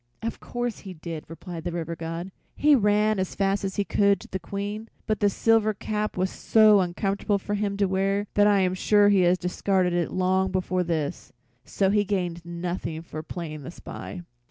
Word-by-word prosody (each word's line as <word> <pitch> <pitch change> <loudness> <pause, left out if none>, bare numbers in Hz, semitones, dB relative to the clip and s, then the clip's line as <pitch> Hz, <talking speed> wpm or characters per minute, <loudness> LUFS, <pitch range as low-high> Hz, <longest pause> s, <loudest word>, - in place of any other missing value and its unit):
"Of 230 - -3
course 240 -1 -4
he 190 -2 -9
did," 160 -1 -7
replied 165 0 -8
the 175 - -3
River 170 -1 -4
God. 165 +3 -5 0.2
"He 300 0 +4
ran 210 -3 +3
as 185 - -2
fast 195 0 +1
as 195 -1 -3
he 205 - +1
could 200 0 +2
to - - -11
the 190 - -4
Queen, 205 +5 -5 0.2
but 215 -1 0
the 205 - +4
silver 215 +1 +2
cap 210 +1 -3
was 185 +1 0
so 215 -2 +5
uncomfortable 195 +3 0
for 205 +1 -4
him 200 -1 -1
to 200 - +3
wear 195 +2 0
that 205 0 +5
I 200 -2 +4
am 185 -1 +1
sure 205 +2 +4
he 200 -2 +4
has 180 +1 +4
discarded 180 0 0
it 175 -2 0
long 185 +1 +1
before 185 -1 0
this. 160 -4 -3 0.3
So 195 -1 +1
he 205 0 +3
gained 180 -4 -2
nothing 170 -1 -4
for 155 -2 -7
playing 155 -2 -6
the 135 - -8
spy." 175 +1 -8
190 Hz, 200 wpm, -26 LUFS, 175-205 Hz, 0.3 s, so